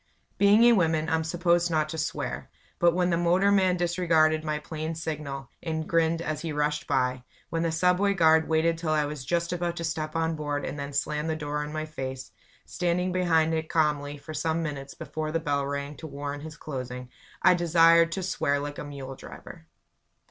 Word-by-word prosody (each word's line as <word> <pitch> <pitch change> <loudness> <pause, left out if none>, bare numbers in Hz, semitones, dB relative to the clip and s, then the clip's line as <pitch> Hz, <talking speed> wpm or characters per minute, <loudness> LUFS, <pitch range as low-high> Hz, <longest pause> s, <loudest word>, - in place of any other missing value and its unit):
Being 205 +3 +6
a 240 0 +7
woman, 160 -5 +2
I'm 160 0 +1
supposed 175 +1 +1
not 155 -2 +1
to 160 - -5
swear; - - -3 0.3
but 170 0 +4
when 180 0 +2
the 170 - +2
motorman 185 +2 +3
disregarded 165 -3 +2
my 155 -1 -1
plain 155 +1 -5
signal, 150 -5 -5
and 160 -2 -3
grinned 165 0 +1
as 155 -1 -3
he 165 - -3
rushed 150 0 -1
by; 125 -1 0 0.3
when 165 - -1
the 165 -1 0
subway 180 +4 +2
guard 160 -2 +4
waited 165 +1 +2
till 160 -2 0
I 150 -1 +2
was 145 -2 -5
just 170 +4 -1
about 175 -1 -2
to 170 - -5
step 155 -1 -3
on 165 0 0
board 145 -2 -3
and 145 - -5
then 140 0 -5
slammed 150 +2 -1
the 160 - 0
door 150 -1 -3
in 150 - -6
my 155 0 -3
face 130 -4 -6 0.3
standing 180 +1 -1
behind 165 -3 +2
it 160 0 -2
calmly 150 -2 0
for 155 +2 -9
some 160 +2 -1
minutes 140 -3 -5
before 155 -1 -4
the 165 - 0
bell 145 -3 -1
rang 140 +1 -4
to 160 - -8
warrant 145 0 -5
his 155 +1 -9
closing 125 -3 -6 0.3
I 185 - +7
desired 165 -1 +5
to 190 - -3
swear 145 -5 0
like 145 0 -5
a - - -4
mule 140 -2 -7
driver. 160 +4 -12
160 Hz, 200 wpm, -27 LUFS, 150-170 Hz, 0.3 s, a